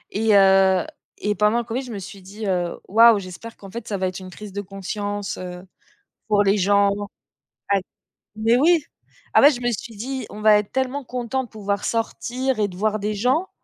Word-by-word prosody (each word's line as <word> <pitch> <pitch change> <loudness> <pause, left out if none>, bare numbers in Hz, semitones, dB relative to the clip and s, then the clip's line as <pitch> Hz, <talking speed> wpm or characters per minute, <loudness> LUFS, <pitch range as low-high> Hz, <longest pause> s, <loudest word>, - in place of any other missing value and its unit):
et 215 -1 +3
heu 190 -1 +5 0.3
et 210 0 -1
pendant 210 +2 +2
le - - -2
covid, 240 +3 -3
je 245 - -9
me - - -5
suis 195 +1 -10
dit, 205 +3 -8
heu: 180 -3 -1
«Waouh, 225 +2 +7
j'espère 195 +5 -8
qu'en 195 -2 -12
fait 235 0 -7
ça 200 - -2
va 185 0 0
être 185 +1 -5
une 185 0 -9
crise 210 +1 -10
de 200 +1 -4
conscience, 205 +1 -5
heu, 180 0 -8 0.6
pour 205 -1 +3
les 200 +1 +3
gens» 200 +1 +3 0.8
ouais. 195 - +2 0.5
Mais 225 +3 +3
oui! 320 +2 +4 0.5
Ah - - +6
bah, 285 - +9
je 250 -5 -2
me 245 0 0
suis 230 0 -6
dit: 255 +2 -4
«On 210 - -9
va 215 -1 +6
être 205 - -6
tellement 265 +1 -1
contents 250 +1 -3
de 240 - -12
pouvoir 200 -2 -3
sortir 240 +2 -2
et 205 - +2
de 180 - -11
voir 215 +1 +1
des 210 +1 -2
gens 255 - +1
210 Hz, 210 wpm, -22 LUFS, 195-235 Hz, 0.8 s, bah